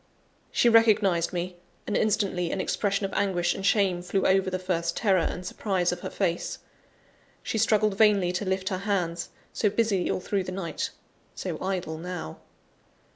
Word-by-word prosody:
She - - +2
recognised 210 -7 +4
me; 180 0 -4 0.3
and, 210 - -2
instantly, 195 -5 +1
an - - -2
expression 200 +1 0
of 195 - -5
anguish 175 -3 +1
and 195 - -6
shame 195 -3 +2
flew 185 +2 -1
over 190 0 +3
the 185 - -1
first 180 -2 -2
terror 195 -5 +3
and 180 +2 -2
surprise 185 -4 0
of 175 - -4
her - - -5
face. 170 0 -1 0.9
She 220 - -2
struggled 215 -1 +2
vainly 205 -5 +4
to 180 +2 -2
lift 190 0 -1
her 185 -2 -2
hands 180 -4 -1 0.2
so 210 - +2
busy 205 -4 +1
all - - 0
through 195 +1 -1
the 185 - -5
night; 185 -3 -3 0.5
so - - -4
idle 185 -4 -2
now! 175 - -6
190 Hz, 170 wpm, -27 LUFS, 180-200 Hz, 0.9 s, recognised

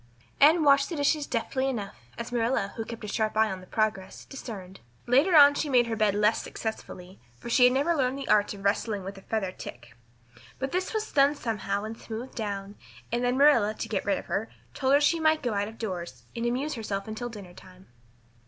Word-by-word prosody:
Anne 315 +3 +6
washed 280 -1 +4
the 340 - -4
dishes 290 0 +1
deftly 260 +3 -1
enough, 205 -6 -4 0.2
as 235 +1 -6
Marilla 230 -4 0
who 225 - -3
kept 230 0 -9
a - - -5
sharp 215 +1 -1
eye 220 -1 +3
on 190 -1 -6
the 185 - -14
process, 215 -3 -2
discerned. 195 -8 -9 0.3
Later 280 +9 +4
on 285 -1 +9
she 295 +1 -2
made 250 -3 +4
her 230 -1 -2
bed 215 -2 +2
less 210 +2 +2
successfully, 190 -4 -7 0.2
for 235 - -8
she 250 +1 +6
had 250 - +5
never 285 +6 +2
learned 265 -3 0
the 275 - -6
art 210 -1 +3
of 195 - -11
wrestling 200 0 0
with 195 +2 -7
a - - -16
feather 200 -3 -2
tick. 120 -9 -11 0.6
But 270 0 -4
is 365 +1 -1
was 435 0 -3
done 280 0 +4
somehow 205 -6 -3
and 220 +1 -5
smoothed 230 +3 -8
down; 205 -3 -5 0.3
and 240 +1 0
then 245 +1 +1
Marilla, 240 -7 +4
to 225 - -5
get 215 -3 -2
rid 200 -1 +1
of - - -7
her, 220 +3 -2 0.2
told 270 0 +2
her 285 - +4
she 330 +3 +3
might 315 -1 +2
go 240 -3 -1
out 200 0 -1
of 225 +1 -11
doors 175 - -5
and 235 0 -1
amuse 270 +6 -1
herself 205 -5 -4
until 220 +3 -5
dinner 200 -6 -10
time. 185 0 -16
225 Hz, 220 wpm, -27 LUFS, 200-270 Hz, 0.6 s, on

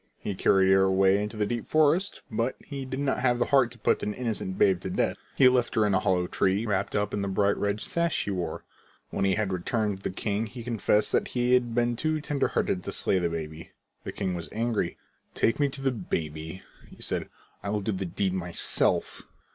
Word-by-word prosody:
He 100 - -4
carried 95 0 +3
her 95 0 +6
away 95 +1 +3
into 105 +1 -4
the 105 - +1
deep 120 +1 -3
forest, 155 +5 +2
but 115 +4 -1
he 140 -2 -7
did 130 +1 -4
not 140 -1 0
have 125 -1 +2
the 120 - +1
heart 135 -4 +5
to 120 - -12
put - - +1
an 105 - -2
innocent 110 -6 -3
babe 95 -2 +3
to 95 - -4
death. - - 0 0.2
He 130 - +6
left 125 -1 +2
her 110 -2 +4
in 105 - +1
a 95 - +4
hollow 90 -1 +1
tree, 95 +4 +1
wrapped 100 -4 -1
up 105 -1 0
in 100 - -1
the 100 - -1
bright 100 +1 +2
red 100 +1 -1
sash 170 -1 0
he 100 - -3
wore. 90 -2 -3 0.5
When 95 - 0
he 95 -1 +3
had 105 -3 -1
returned 105 +2 -1
to 95 - -19
the - - -1
king 105 +2 -1
he 120 +2 -9
confessed 110 -2 +1
that - - +1
he 125 0 +1
had 120 -2 +2
been 120 0 +2
too 155 +5 0
tender 145 -2 0
hearted 90 - -1
to - - -3
slay 95 - +1
the 85 -1 0
baby. 80 -1 -6 0.3
The - - -5
king 95 -2 -2
was 85 -3 -5
angry. 115 -5 -1 0.4
"Take 115 - +1
me 145 -1 +3
to 135 0 -8
the 135 - +2
baby," 80 -5 -4 0.2
he - - -16
said. - - -3 0.3
"I'll 105 +1 -1
do 100 - -1
the 95 -1 -3
deed 95 +2 -1
myself." 90 -2 +1
105 Hz, 225 wpm, -27 LUFS, 95-120 Hz, 0.5 s, her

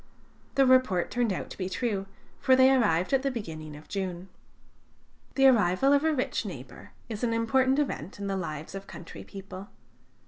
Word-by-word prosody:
The 275 - +5
report 255 -9 +3
turned 245 -3 +1
out 185 - -4
to - - -9
be 185 -1 -2
true, 200 -2 -2 0.3
for 260 - +4
they 260 +1 +6
arrived 195 -6 +2
at 270 - +4
the 275 - 0
beginning 160 - -6
of 150 - -13
June. 185 -2 -4 1.1
The 270 - +4
arrival 240 +1 +4
of 285 +1 +3
a 320 - +3
rich 265 -4 -1
neighbor - - -9 0.2
is 220 -1 -6
an 230 -1 +1
important 260 +4 +2
event 235 - -2
in 200 - -5
the 195 -1 -1
lives 155 -4 -5
of 195 0 -7
country 170 - -10
people. 195 0 -10
210 Hz, 180 wpm, -28 LUFS, 185-260 Hz, 1.1 s, they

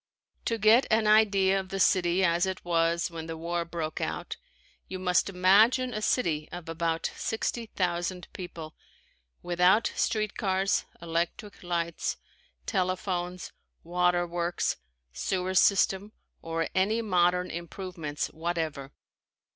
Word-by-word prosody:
To 230 - 0
get 220 +4 +5
an 220 0 +3
idea 200 -3 +4
of 190 -1 -7
the 195 0 -4
city 180 0 +3
as 170 +2 +2
it 190 -2 -5
was 170 0 +1
when 165 -1 -6
the 165 -1 -5
war 170 +1 -2
broke 165 -2 -4
out - - -3 0.5
you 190 - -5
must 180 +1 +1
imagine 215 +7 +4
a 215 - -3
city 160 -10 0
of 175 -2 -8
about 165 0 -1
sixty 225 +1 -2
thousand 175 -1 -2
people, 165 -4 -8 0.7
without 180 +5 +3
street 215 -2 0
cars, 195 0 +1 0.2
electric 170 +5 -3
lights, 170 -2 -2 0.5
telephones, 185 -2 -2 0.3
waterworks, 175 0 0 0.4
sewer 185 - -2
system 195 +2 +3 0.3
or 165 0 -2
any 215 +5 +1
modern 180 -2 +2
improvements 170 -3 -5
whatever. 160 -4 -3
180 Hz, 120 wpm, -28 LUFS, 170-195 Hz, 0.7 s, get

